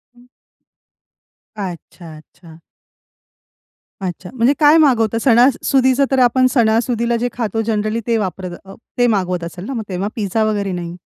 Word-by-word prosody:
हं. 245 0 -20 1.3
अच्छा, 175 -3 -8
अच्छा. 160 +1 -17 1.4
अच्छा, 180 -1 -5
म्हणजे 250 +2 +2
काय 300 +1 +6
मागवता 230 -8 +3
सणासुदीचं, 260 +2 +3
तर 265 - +2
आपण 255 +1 +3
सणासुदीला 235 0 +1
जे 245 +1 -1
खातो, 225 -2 -2
जनरली 215 0 -1
ते 230 -1 +2
वापरत 185 -3 -4
अ, 195 - -11 0.2
ते 245 - +3
मागवत 185 -5 -1
असेल 175 +2 -7
ना? 270 - -5
मग 225 - -4
तेव्हा 190 +1 -3
पिझ्झा 215 0 -1
वगैरे 205 -3 -1
नाही. 175 -1 -5
220 Hz, 140 wpm, -18 LUFS, 185-245 Hz, 1.4 s, काय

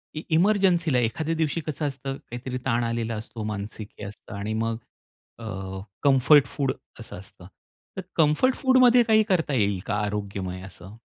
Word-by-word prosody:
इ 155 - -3
इमर्जन्सीला 175 -5 +3
एखाद्या 155 +8 -1
दिवशी 160 +1 0
कसं 155 0 -2
असतं, 135 0 -4
काहीतरी 125 +1 -6
ताण 120 -2 +1
आलेला 115 -1 -2
असतो, 110 +1 -7
मानसिक 105 0 -5
हे 105 - -6
असतं 100 +2 -10
आणि 100 +2 -3
मग 115 0 -1 0.6
अ, 95 -4 -6 0.2
कम्फर्ट 140 +1 +6
फूड 135 -3 -1 0.3
असं - - -8
असतं. 95 -2 -13 0.5
तर - - -2
कम्फर्ट 160 - +3
फूडमध्ये 255 -2 +5
काही 220 -1 +4
करता 165 -6 +1
येईल 100 -6 +1
का 105 - -1
आरोग्यमय 100 -3 -3
असं? 95 +2 -10
120 Hz, 155 wpm, -25 LUFS, 105-160 Hz, 0.6 s, कम्फर्ट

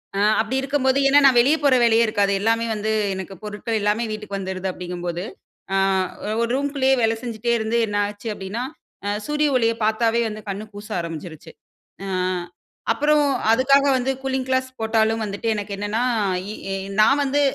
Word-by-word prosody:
ஆ - - 0 0.2
அப்படி 225 +4 -3
இருக்கும்போது, 270 -1 +1
ஏனா 280 +1 +6
நான் 260 -3 +6
வெளியே 280 +6 +4
போற 280 -2 +5
வேலையே 230 0 +5
இருக்காது. 205 -2 +1
எல்லாமே 230 +2 +1
வந்து 215 +1 -2 0.2
எனக்கு 190 0 -6
பொருட்கள் 210 +2 -3
எல்லாமே 210 +3 +1
வீட்டுக்கு 210 -2 -5
வந்துடுது 190 -1 -4
அப்படிங்கும்போது, 175 -1 -5 0.5
ஆ - - +2 0.6
ஒரு 235 - 0
ரூம்க்குள்ளேயே 275 -1 +1
வேலை 225 0 +2
செஞ்சிட்டே 235 -1 -2
இருந்து 220 +1 -1
என்ன 205 0 -2
ஆச்சு 205 +2 -8
அப்படினா, 205 +4 -5 0.6
சூரிய 300 0 +1
ஒளிய 230 -2 +3
பார்த்தாவே 225 +2 +2
வந்து 215 0 -6
கண் 200 +2 -4
கூச 205 +1 -9
ஆரம்பிச்சிருச்சு. 165 -1 -7 0.5
அ - - -5 0.8
அப்புறம் 295 +6 +3 0.3
அதுக்காக 275 +4 +4
வந்து 260 +1 0
கூலிங் 265 -1 -2
கிளாஸ் 260 0 +1
போட்டாலும் 220 0 +1
வந்துட்டு 205 +2 -4
எனக்கு 205 0 -5
என்னனா, 205 +3 -2 0.5
இ - - -5 0.5
நான் 275 +7 +5
வந்து 285 +1 +1
225 Hz, 155 wpm, -22 LUFS, 205-260 Hz, 0.8 s, ஏனா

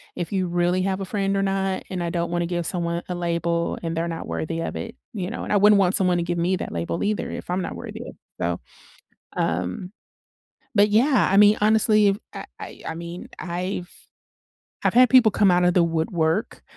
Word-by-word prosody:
if 175 0 -4
you 185 -2 0
really 175 +1 +1
have 190 0 -1
a - - -3
friend 195 0 -1
or 195 - +1
not, 195 -1 -1
and 180 -2 -2
I 170 - -2
don't 170 0 -2
wanna 175 0 0
give 175 -1 -2
someone 170 0 -2
a 180 - -3
label 170 -1 -1
and 165 0 -2
they're 165 +1 -1
not 165 -1 -5
worthy 165 +1 -3
of 165 - -4
it, 230 - -6 0.2
you 190 -5 -3
know? 235 - -5
And - - -2
I - - +5
wouldn't 205 +1 +6
want 190 0 +3
someone 180 -2 +2
to 170 - 0
give 175 0 -2
me 180 +3 +1
that - - -5
label 85 0 -3
either 210 0 -1
if - - -7
I'm 185 +1 0
not - - -5
worthy - - -8
of - - -10 0.3
So, 85 0 -1 0.8
um 90 - -2 0.8
But, 205 0 +5
yeah, 240 +3 +3
I 195 - +4
mean, 210 +1 +7
honestly, 215 -1 +4
I've 195 +1 -1
I - - -7
I - - -9
I 160 - -4
mean, 170 +2 -8
I've 180 +1 -4 0.9
I've - - +1
had 250 0 +7
people 250 -4 +7
come 200 -3 +4
out 180 0 +3
of 175 0 +3
the 180 - +5
woodwork, 165 +3 -1
180 Hz, 220 wpm, -23 LUFS, 170-200 Hz, 0.9 s, mean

